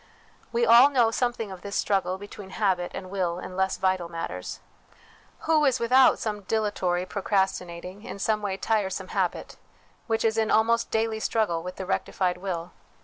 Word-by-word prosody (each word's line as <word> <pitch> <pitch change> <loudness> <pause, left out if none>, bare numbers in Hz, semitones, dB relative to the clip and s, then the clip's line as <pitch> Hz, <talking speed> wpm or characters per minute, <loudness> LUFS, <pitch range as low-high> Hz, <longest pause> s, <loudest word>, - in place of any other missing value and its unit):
We 235 0 +2
all 235 +4 +8
know 240 -5 +3
something 240 -3 -1
of 185 -2 -9
this 200 +1 -6
struggle 190 -2 0
between 205 0 -10
habit 190 -3 0
and 185 -1 -7
will 180 -3 -1
in 185 0 -7
less 190 0 0
vital 185 -2 0
matters. 165 - -5 0.8
Who 315 -1 +3
is 265 -3 +3
without 255 +3 +5
some 210 -2 -3
dilatory, 190 -4 -1
pro 200 +2 -5
crastinating, 190 -1 -2
in 240 - -7
some 215 +2 0
way 195 -2 -2
tiresome, 205 -2 -1
habit, - - -2 0.5
which 225 -1 0
is 225 0 +2
in 220 0 +1
almost 230 +2 +3
daily 220 0 0
struggle 215 -7 0
with 180 +2 -7
the 190 - -5
rectified 185 -1 -1
will 180 -2 -4
200 Hz, 170 wpm, -26 LUFS, 185-225 Hz, 0.8 s, all